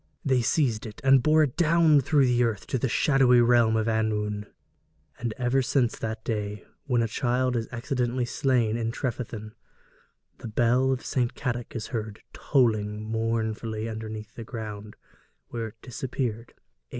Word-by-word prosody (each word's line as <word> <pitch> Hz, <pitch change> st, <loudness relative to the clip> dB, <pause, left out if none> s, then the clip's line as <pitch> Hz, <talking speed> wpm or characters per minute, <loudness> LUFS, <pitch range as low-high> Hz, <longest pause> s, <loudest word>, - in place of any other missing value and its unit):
They 130 Hz, -3 st, +3 dB
seized 120 Hz, -3 st, +1 dB
it 105 Hz, -, -10 dB
and 135 Hz, -1 st, +6 dB
bore 155 Hz, +3 st, +4 dB
it 135 Hz, -5 st, -2 dB
down 165 Hz, -3 st, +4 dB
through 140 Hz, +1 st, +3 dB
the 125 Hz, -1 st, +3 dB
earth 110 Hz, -4 st, -1 dB
to 130 Hz, -, -2 dB
the 130 Hz, -, 0 dB
shadow 135 Hz, +1 st, +3 dB
realm 120 Hz, -2 st, +4 dB
of 110 Hz, -, 0 dB
annwn. 105 Hz, -2 st, -1 dB, 0.7 s
And 115 Hz, -1 st, -2 dB
ever 125 Hz, +2 st, +2 dB
since 125 Hz, -2 st, +1 dB
that 110 Hz, 0 st, -4 dB
day, 105 Hz, -2 st, -3 dB, 0.2 s
when 125 Hz, -5 st, +2 dB
a -, -, 0 dB
child 125 Hz, +2 st, 0 dB
is 115 Hz, -1 st, -1 dB
accidentally 125 Hz, 0 st, -1 dB
slain 120 Hz, -3 st, +1 dB
at 115 Hz, -1 st, -1 dB
Trefethin, 115 Hz, -4 st, -4 dB, 0.9 s
the -, -, -7 dB
bell 120 Hz, +4 st, +2 dB
of 130 Hz, -, -2 dB
St. 125 Hz, -3 st, -1 dB
Cadoc 120 Hz, -2 st, -4 dB
is 110 Hz, -2 st, -4 dB
heard 110 Hz, -2 st, -4 dB
tolling 110 Hz, -6 st, +1 dB
mournfully 110 Hz, 0 st, -2 dB
underneath 110 Hz, -1 st, -6 dB
the 115 Hz, -, -8 dB
ground 105 Hz, -2 st, -7 dB, 0.5 s
where 115 Hz, -1 st, -4 dB
it 110 Hz, +1 st, -15 dB
disappeared 120 Hz, -2 st, -4 dB
ages -, -, -25 dB
ago. -, -, -37 dB
115 Hz, 160 wpm, -26 LUFS, 110-130 Hz, 0.9 s, and